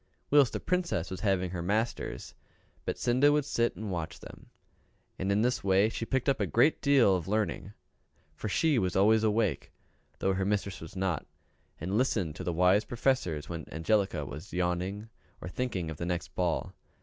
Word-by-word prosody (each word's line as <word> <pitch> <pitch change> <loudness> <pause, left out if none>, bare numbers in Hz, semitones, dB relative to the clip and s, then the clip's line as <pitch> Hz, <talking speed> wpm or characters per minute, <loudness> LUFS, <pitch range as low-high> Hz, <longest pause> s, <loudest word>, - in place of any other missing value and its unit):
Whilst 145 -4 +6
the - - -2
Princess 175 - -1
was 95 - -4
having 95 -4 0
her 90 -2 -4
masters, 110 +7 -2 0.5
Betsinda 130 +4 +3
would 150 -1 +2
sit 120 -4 0
and 105 -2 -5
watch 85 -2 -4
them; - - -13 0.7
and 95 +1 0
in 105 +2 +2
this 125 +1 0
way 100 +2 +4
she 115 0 -4
picked 130 -2 0
up 140 - +2
a - - 0
great 155 - +3
deal 135 -9 +5
of 85 -3 -3
learning; 105 -1 -1 0.6
for 105 +7 -5
she 150 +4 +2
was 90 -3 -1
always 110 +3 +4
awake, 110 -2 0 0.5
though 95 - +1
her 95 0 -1
mistress 100 -1 -1
was 80 +2 -10
not, 95 -5 -1 0.5
and 95 +7 -1
listened 95 - 0
to - - -5
the 85 - -1
wise 90 +5 +4
professors 115 - -1
when 85 -2 -7
Angelica 95 +6 0
was 75 +8 -9
yawning 90 +4 -1 0.3
or - - -7
thinking 90 -5 -3
of 80 - -7
the 85 - -4
next 90 -1 -3
ball. 90 -3 -1
100 Hz, 180 wpm, -30 LUFS, 90-115 Hz, 0.7 s, Whilst